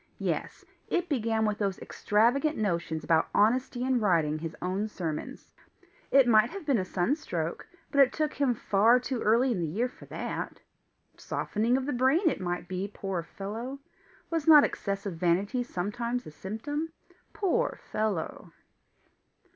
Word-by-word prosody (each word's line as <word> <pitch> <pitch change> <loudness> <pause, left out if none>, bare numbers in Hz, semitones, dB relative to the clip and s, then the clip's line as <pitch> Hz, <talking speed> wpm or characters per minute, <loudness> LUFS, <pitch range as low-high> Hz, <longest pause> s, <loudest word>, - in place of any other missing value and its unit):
Yes - - -3 0.2
it 355 0 -1
began 225 -5 +1
with 210 0 -1
those 195 -3 -1
extravagant 245 +9 +1
notions 170 -6 -1
about 160 -1 +2
honesty 245 +3 +2
in 260 -1 +2
writing 165 -7 +2
his 165 0 -5
own 190 +4 -1
sermons! 165 -7 -5 0.6
It 270 -2 +5
might 220 0 +5
have 395 -3 -8
been 275 -7 +2
a 185 - -2
sunstroke, 175 - -2 0.2
but 280 - +1
it 265 - +5
took 305 -1 -1
him 270 -4 +1
far 220 +4 +4
too 250 -1 -3
early 235 +5 +3
in 215 - -1
the 165 - -1
year 215 +11 0
for 250 - -15
that! - - -5 0.6
Softening 230 +4 0
of 265 - -2
the 290 - -1
brain 265 +9 +3
it - - -5
might 175 0 -3
be, 185 +2 -3
poor 195 -4 -3
fellow! 220 +10 -6 0.5
Was 325 -2 -1
not 300 -2 +9
excessive 200 -3 -3
vanity 190 +8 +1
sometimes 235 +3 -3
a - - -9
symptom? 290 - -4 0.4
Poor 425 +5 0
fellow! 210 -6 -2
220 Hz, 155 wpm, -29 LUFS, 185-260 Hz, 0.6 s, not